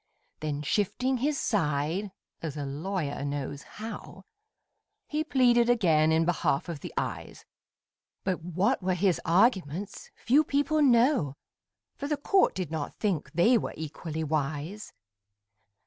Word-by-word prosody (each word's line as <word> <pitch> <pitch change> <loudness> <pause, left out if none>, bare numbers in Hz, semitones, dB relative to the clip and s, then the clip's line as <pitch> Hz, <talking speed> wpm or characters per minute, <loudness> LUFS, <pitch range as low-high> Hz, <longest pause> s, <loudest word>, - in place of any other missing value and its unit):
Then 150 -1 -3
shifting 250 - 0
his 285 +4 0
side 165 +1 0 0.3
(as 155 -3 -5
a 145 - -3
lawyer 150 +1 -3
knows 140 0 -4
how), 220 +2 -9 0.8
He 305 0 -1
pleaded 245 -5 +3
again 160 -10 +4
in 160 +1 +3
behalf 160 -5 0
of 170 -4 -5
the - - -7
Eyes; - - -4 0.8
But 185 -3 -1
what 185 +9 0
were 185 0 0
his 185 -1 +1
arguments 190 - +1
few 280 +6 +3
people 295 +2 +1
know, 240 - +4 0.6
For 285 - -4
the 300 0 0
court 380 +7 +3
did 180 -5 -3
not 155 -3 -4
think 180 -10 -1
they 225 +9 +4
were - - -5
equally 160 +1 -5
wise. 155 +6 -3
180 Hz, 130 wpm, -28 LUFS, 155-240 Hz, 0.8 s, again